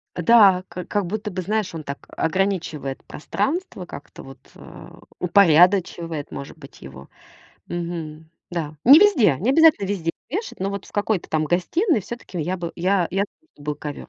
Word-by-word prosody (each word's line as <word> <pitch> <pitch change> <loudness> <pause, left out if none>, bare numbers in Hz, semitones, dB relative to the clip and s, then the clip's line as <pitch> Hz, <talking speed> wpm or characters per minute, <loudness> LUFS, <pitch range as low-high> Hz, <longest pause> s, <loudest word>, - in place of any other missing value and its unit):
Э, 175 - -3
да, 195 -3 +6
как 180 -1 -8
как 205 -2 -1
будто 210 +3 -4
бы, 185 0 -4
знаешь, 210 0 -2
он 155 - -6
так 140 0 -8
ограничивает 165 -6 -2
пространство, 280 - -3
как-то 145 - -11
вот, 135 -1 -13 0.2
э, - - -12 0.3
упорядочивает 175 -3 +3
может 140 +3 -8
быть 140 -3 -15
его. 65 +1 -12 0.6
Мгм. 165 -2 -6 0.2
Да. 160 -3 -4
Не 280 +6 +9
везде. 275 - +4
Не 225 +8 +1
обязательно 310 -8 +5
везде 175 -5 -2 0.2
вешать, 420 - -5
но 195 +1 -1
вот 200 -1 -5
в - - -17
какой-то 205 -3 -1
там 155 0 0
гостиной 230 - +1
всё-таки 200 -3 -7
я 180 +5 -2
бы, 170 -2 -5
я 180 0 +1
я 195 +2 0
за - - -2
то, 320 - -39
чтобы 145 - -16
был 150 0 -2
ковёр. 145 -1 -7
180 Hz, 180 wpm, -22 LUFS, 160-205 Hz, 0.6 s, Не